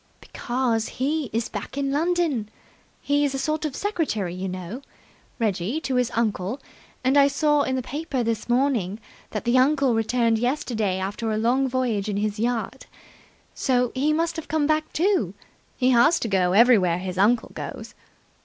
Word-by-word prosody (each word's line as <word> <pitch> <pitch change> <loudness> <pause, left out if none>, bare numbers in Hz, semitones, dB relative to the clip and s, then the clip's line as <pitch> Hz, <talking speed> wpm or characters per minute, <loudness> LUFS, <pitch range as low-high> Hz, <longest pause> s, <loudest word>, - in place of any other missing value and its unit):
"Because 240 -3 -2
he 295 +4 0
is 230 +1 -1
back 205 +6 -7
in 275 -1 0
London! 310 -7 0 0.5
He's 285 -1 +1
a - - -1
sort 305 +3 -1
of 290 -3 -3
secretary, 300 - -2
you 185 +1 -4
know, 185 +7 -6 0.6
Reggie, 215 - -1
to 270 - -3
his 250 -2 +2
uncle, 220 +1 -1 0.4
and 265 +3 +3
I 280 - +6
saw 295 +1 +2
in 260 -2 0
the 255 - -2
paper 285 -1 -3
this 230 0 -2
morning 240 -6 +1 0.3
that 215 - -4
the 240 +2 +4
uncle 275 -1 +3
returned 225 0 +1
yesterday 230 -6 -1
after 205 +4 -3
a 215 - 0
long 250 +5 +2
voyage 235 -5 -1
in 200 - -2
his 210 0 -2
yacht. 235 0 -2 0.7
So 250 -2 +1
he 280 +4 +1
must 330 +2 0
have 320 - -6
come 310 -1 +1
back, 310 +1 0
too. 380 +4 +1 0.4
He 255 0 +3
has 290 +8 +5
to - - -1
go 185 -3 +2
everywhere 200 -6 +5
his 185 0 -5
uncle 225 +4 +3
goes." - - -7
245 Hz, 170 wpm, -24 LUFS, 215-285 Hz, 0.7 s, I